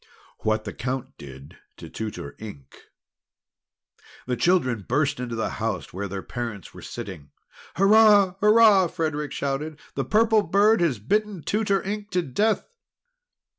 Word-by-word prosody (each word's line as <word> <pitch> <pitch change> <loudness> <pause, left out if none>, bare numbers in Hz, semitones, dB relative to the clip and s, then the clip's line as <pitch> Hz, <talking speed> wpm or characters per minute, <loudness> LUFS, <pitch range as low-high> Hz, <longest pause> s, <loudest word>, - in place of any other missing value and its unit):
WHAT 110 0 0
THE 105 - -6
COUNT 130 +1 -5
DID 70 0 -12 0.2
TO - - -10
TUTOR 105 -10 -6
INK 100 -12 -11 1.4
The 125 - -1
children 130 - +1
burst 140 +1 +1
into 120 -2 -4
the 110 - -2
house 110 -5 -3
where 100 +3 -4
their 95 0 -6
parents 115 -6 -6
were - - -11
sitting. 80 -8 -8 0.5
"Hurrah! 205 -1 +5
Hurrah!" 210 -3 +6
Frederic 155 -4 -3
shouted. 145 +2 -3 0.2
"The - - -2
Purple 220 0 +3
Bird 205 +1 +3
has 160 -8 +1
bitten 200 - -1
Tutor 205 -2 0
Ink 205 +1 -5
to 180 -1 +1
death!" 205 - 0
150 Hz, 135 wpm, -24 LUFS, -, 1.4 s, Hurrah